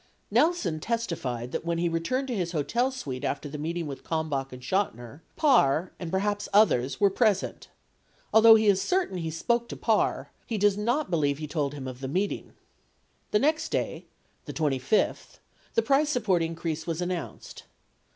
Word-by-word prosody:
7 - - +5
Nelson 305 - 0
testified 155 - -3
that - - -3
when 170 0 -1
he 170 +1 +1
returned 170 +12 -1
to 250 - -2
his 180 -3 -2
hotel 235 - +1
suite 140 - -6
after 145 - -2
the 145 +1 -7
meeting 165 +2 -3
with 140 -2 -7
Kalmbach 150 -5 -2
and 125 - -9
Chotiner, 140 - -2
Parr 180 - +3
and 175 - -5
perhaps 205 +3 -1
others 140 - +3
were 200 -1 +4
present. 205 -2 0 0.7
Although 220 0 +9
he 220 0 +3
is 195 -2 +4
certain 360 - 0
he 165 -1 -3
spoke 235 +9 -1
to - - -6
Parr, - - 0 0.2
he 225 - -2
does 205 -1 +3
not 240 +6 -1
believe 145 -4 +1
he 155 - -5
told 145 -2 -2
him 135 -2 -6
of 130 -1 -7
the 135 - -4
meeting. 190 +9 -1
8 - - -24 0.8
The 210 - +2
next 310 +3 +1
day, - - -3 0.4
the - - -6
25th, 145 +5 0 0.4
the 460 - +3
price 285 +2 +3
support 215 - +1
increase 165 -1 -3
was 165 -1 -2
announced. 175 -3 -5
175 Hz, 180 wpm, -27 LUFS, 150-220 Hz, 0.8 s, Although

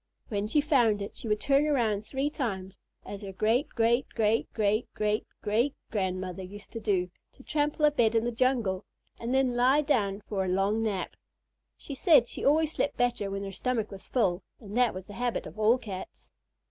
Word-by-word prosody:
When 205 -2 -1
she 295 +7 +3
found 245 -9 +3
it, 200 - -6
she - - -7
would 210 -1 +1
turn 280 +4 +3
around 230 -8 +1
three 270 +6 -2
times, 195 -9 -4 0.3
as 200 - -7
her 200 -2 -6
great 225 +8 +1
great 235 +2 +1
great 220 +1 +1
great 215 +1 0
great 210 0 0 0.2
great 235 +7 +1 0.2
grandmother 185 -3 -2
used 200 +3 -10
to 230 - -5
do 185 -5 0 0.2
to 260 - -17
trample 295 +1 +1
a 300 - +5
bed 235 -6 +2
in 225 - +3
the 240 - 0
jungle, 235 -6 +1 0.4
and 235 +1 -3
then 260 -2 +2
lie 260 +4 +4
down 210 -9 0
for 195 -3 -1
a - - -2
long 195 +4 +1
nap. 205 -4 -2 0.6
She 285 - -7
said 270 -3 +5
she - - -6
always 310 +2 +3
slept 290 - -1
better 240 -5 +1
when 195 0 -4
her 195 - -5
stomach 225 +2 -2
was 195 -1 -10
full, 190 -7 +1 0.2
and 210 -2 -9
that 245 -4 +3
was 185 0 -6
the 205 - -11
habit 245 +2 -2
of - - -10
all 220 +3 +5
Cats. 200 -6 -8
225 Hz, 200 wpm, -29 LUFS, 200-255 Hz, 0.6 s, a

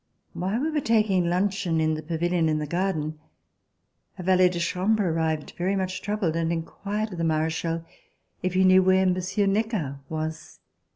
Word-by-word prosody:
While 195 +7 -1
we 315 +2 0
were 300 -1 0
taking 210 -7 +2
luncheon 180 -2 0
in 155 0 +2
the 155 - -3
pavilion 165 +1 0
in 155 - +1
the 150 - -2
garden, 155 -2 -2 1.0
a 185 - -6
valet 185 0 +5
de 180 - -4
chambre 185 +4 +1
arrived 160 -2 -1
very 185 +3 +1
much 185 -1 -2
troubled 205 -6 -1
and 165 0 0
inquired 205 +6 -3
of 180 - -7
the - - 0
Marechal 160 +1 -1 0.6
if 185 0 -2
he 190 - +4
knew 185 0 +6
where 190 0 +4
Monsieur 185 +2 +1
Necker 195 - -1
was. 155 0 -5
180 Hz, 170 wpm, -25 LUFS, 160-195 Hz, 1.0 s, knew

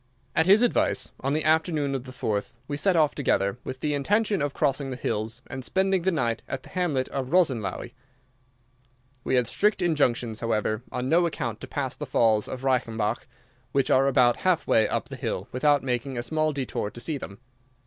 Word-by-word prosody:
At 160 - +3
his 205 +5 +6
advice, 245 - +1
on 135 +1 -1
the 155 - 0
afternoon 155 -2 +1
of 135 -1 -3
the 130 - -9
4th 110 -5 -2
we 145 - -3
set 180 +5 +2
off 155 -3 +3
together, 100 -6 0
with 130 - -7
the 150 -1 0
intention 205 +7 +1
of 145 0 0
crossing 140 -1 0
the 130 - -4
hills 110 -2 -3
and 130 0 -7
spending 190 +4 +1
the 190 +2 +1
night 120 -8 -1
at 135 -1 -5
the - - -14
hamlet 160 -8 0
of 135 -2 -3
Rosenlaui. 125 - +1 1.3
We - - 0
had 125 -1 +3
strict 205 - +1
injunctions, 125 - +1
however, 110 -1 -1
on 125 - -3
no 170 +4 +4
account 120 -9 -4
to - - -7
pass - - -3
the - - -6
falls 110 -2 +2
of 130 0 -6
Reichenbach, 115 -4 0 0.5
which 140 -1 +2
are 135 +1 +4
about 125 -3 +4
half 185 -3 +1
way 110 -1 +3
up - - -2
the - - -6
hill, - - -3
without 145 +2 +2
making 125 0 -2
a 120 - -2
small 155 +4 0
détour 130 -7 -3
to - - -9
see 145 +3 -2
them. 100 - -8
135 Hz, 200 wpm, -26 LUFS, 120-155 Hz, 1.3 s, his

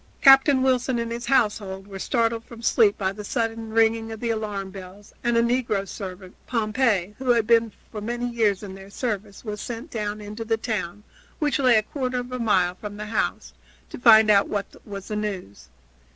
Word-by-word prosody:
Captain 270 -1 +7
Wilson 255 -1 +1
and 230 0 -3
his 235 +1 -5
household 205 -7 +1
were 195 -1 -9
startled 230 +1 0
from 230 0 -12
sleep 220 -3 +4
by 190 -1 0
the 210 +1 -8
sudden 225 0 -2
ringing 225 0 +2
of 220 - -7
the 235 0 -1
alarm 205 -3 -3
bells, 195 +1 -11
and 240 -1 +2
a 230 - +4
negro 235 -5 0
servant, 185 -2 -8
Pompey, 215 -4 +1
who 260 -1 -3
had 235 -2 +4
been 230 0 +3 0.2
for 215 - -6
many 240 +3 -3
years 220 -4 +1
in 195 -2 -7
their 195 0 -11
service, 210 -1 -4
was 210 -1 -5
sent 240 +6 -6
down 210 -2 -3
into 210 +2 -6
the 225 0 0
town, 210 -4 -4 0.3
which 295 -1 0
lay 255 -3 +5
a 215 - +4
quarter 255 +1 -3
of 245 0 -4
a 255 - -4
mile 190 -6 +2
from 205 +2 -8
the 210 - -5
house, 220 +1 -2 0.4
to - - -7
find 220 -3 +7
out 200 -1 +4
what 205 -1 -1 0.2
was 200 -2 -8
the 210 - -4
news. 200 - -5
220 Hz, 200 wpm, -24 LUFS, 205-235 Hz, 0.4 s, Captain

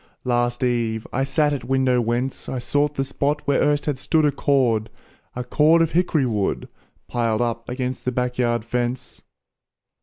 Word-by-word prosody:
Last 120 0 0
eve, 115 -3 0
I 135 - +1
sat 145 +2 +1
at 135 -4 -4
window 130 0 +2
whence 120 +3 -2
I 130 - -3
sought 145 +4 0
the 135 - -1
spot 145 +2 -1
where 140 -1 +2
erst 145 0 +2
had 145 -3 -2
stood 155 +2 +2
A 145 - +3
cord 125 -6 +1 0.5
a 125 - -3
cord 155 +6 +4
of 165 - -1
hick'ry 165 -5 +2
wood, 105 -5 -1 0.4
Piled 115 -2 0
up 115 -1 -3
against 125 0 -4
the 125 - +1
back 125 0 -2
yard 120 -2 +1
fence. 120 +1 -3
125 Hz, 175 wpm, -22 LUFS, 120-145 Hz, 0.5 s, cord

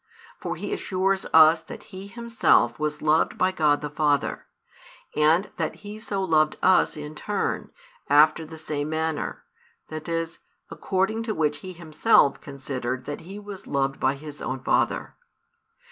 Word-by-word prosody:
For - - -4
He - - -4
assures 190 0 0
us 160 0 +7
that 165 - -10
He 190 +1 -7
Himself 225 - +2
was 150 0 -2
loved 155 +1 +2
by 185 0 +2
God 150 -5 +2
the 150 - -4
Father, 145 -2 0 0.7
and 160 +6 +3
that - - -2
He 210 +1 -7
so 200 -3 -3
loved 155 -4 +2
us 185 -3 +4
in 150 0 -7
turn, 205 +6 -2 0.4
after 155 +2 +5
the 160 +1 -10
same 150 -1 -3
manner, 160 -1 -2 0.5
that 155 +1 -6
is, 165 0 -3 0.3
according 195 +4 -1
to 215 - -1
which 150 -2 +1
He 185 +5 -9
Himself 160 -2 +3
considered 130 -2 -5
that 145 0 -5
He 190 +5 -9
was 205 -2 -9
loved 135 -1 -1
by 130 +1 +2
His 150 +1 -10
own 130 0 -4
Father. - - +1
155 Hz, 155 wpm, -25 LUFS, 145-185 Hz, 0.7 s, us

